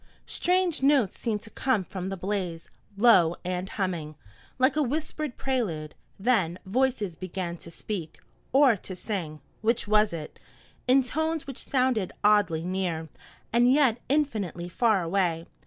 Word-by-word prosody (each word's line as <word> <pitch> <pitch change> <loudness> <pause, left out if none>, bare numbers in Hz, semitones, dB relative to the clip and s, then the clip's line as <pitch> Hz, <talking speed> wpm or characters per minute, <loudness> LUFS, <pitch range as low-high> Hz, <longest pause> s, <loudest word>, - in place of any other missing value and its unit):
Strange 360 -3 +1
notes 270 -7 +3
seemed 215 -3 -2
to 220 - -12
come 260 -7 +1
from 185 0 -5
the 195 - -4
blaze, 180 -3 -3 0.3
low 190 -7 +5
and 180 +1 -2
humming, 170 -6 -3 0.4
like 260 +3 +3
a 305 - +2
whispered 300 0 -2
prelude, 205 - -2 0.2
then 190 -6 +1
voices 220 -4 0
began 185 0 -4
to 170 - -12
speak, 170 -1 -6 0.3
or 270 -3 +6
to 185 -1 -8
sing 175 -6 -4 0.2
which 225 +1 +1
was 210 0 +4
it? 160 -3 -7 0.5
in 260 +1 +5
tones 315 +4 -1
which 275 -3 -7
sounded 255 -7 +1
oddly 205 -6 +3
near, 175 -4 -2 0.4
and 240 +1 +5
yet 260 -5 +4
infinitely 215 - 0
far 210 0 +2
away. 170 -2 0
205 Hz, 140 wpm, -27 LUFS, 175-255 Hz, 0.5 s, or